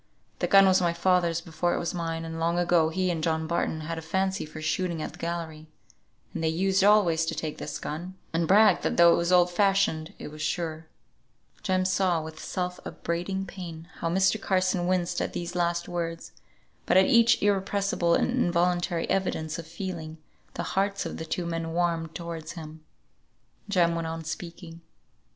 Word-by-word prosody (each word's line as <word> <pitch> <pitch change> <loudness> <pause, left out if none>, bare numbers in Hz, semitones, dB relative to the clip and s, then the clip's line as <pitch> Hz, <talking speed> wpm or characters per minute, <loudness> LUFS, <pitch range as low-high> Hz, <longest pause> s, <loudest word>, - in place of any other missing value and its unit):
The - - 0
gun 195 0 +7
was 190 -1 +4
my 170 -1 +2
father's 170 -1 +2
before 175 +1 -1
it - - -1
was 170 - -2
mine, 165 -2 -3
and 165 0 -6
long 170 +1 +1
ago 175 -2 +3
he 185 +2 0
and 165 -2 -2
John 160 0 0
Barton 160 -1 -1
had 165 +1 -4
a - - -7
fancy 190 +2 -1
for 155 +1 -9
shooting 165 +2 -1
at - - -4
the - - -14
gallery; 165 -2 -5 0.7
and - - -4
they - - +2
used 190 +4 +1
always 195 -6 +4
to - - -2
take 155 -2 -4
this 150 - -5
gun, 175 +5 -6 0.2
and 165 0 +1
brag 210 +4 +5
that - - -1
though 170 0 +7
it - - +2
was 170 +1 0
old 180 -1 +5
fashioned 195 -3 +1
it - - -7
was 155 +1 -10
sure." 160 0 -3 0.7
Jem 185 -1 +1
saw 185 -2 +2
with 160 0 -8
self 180 -1 -3
upbraiding 180 +3 -3
pain 170 -3 -8
how 165 - -1
Mr. 190 +4 +2
Carson 185 -2 +1
winced 180 -1 0
at - - -3
these 175 0 -4
last 170 -1 0
words, 165 -1 -4 0.6
but - - +4
at 190 - +7
each 235 +2 +5
irrepressible 195 -3 +1
and - - +1
involuntary 175 -6 +1
evidence 160 -4 -1
of 165 - -8
feeling, 165 -2 -6 0.4
the - - -2
hearts 195 +1 -1
of - - -5
the 160 - -5
two 175 +2 -3
men 165 -1 -3
warmed 165 -2 -1
towards 165 -2 -6
him. 160 -2 -10 0.9
Jem 175 -4 +3
went 165 -1 -2
on 165 0 -5
speaking. 170 +1 -7
170 Hz, 185 wpm, -27 LUFS, 165-185 Hz, 0.9 s, gun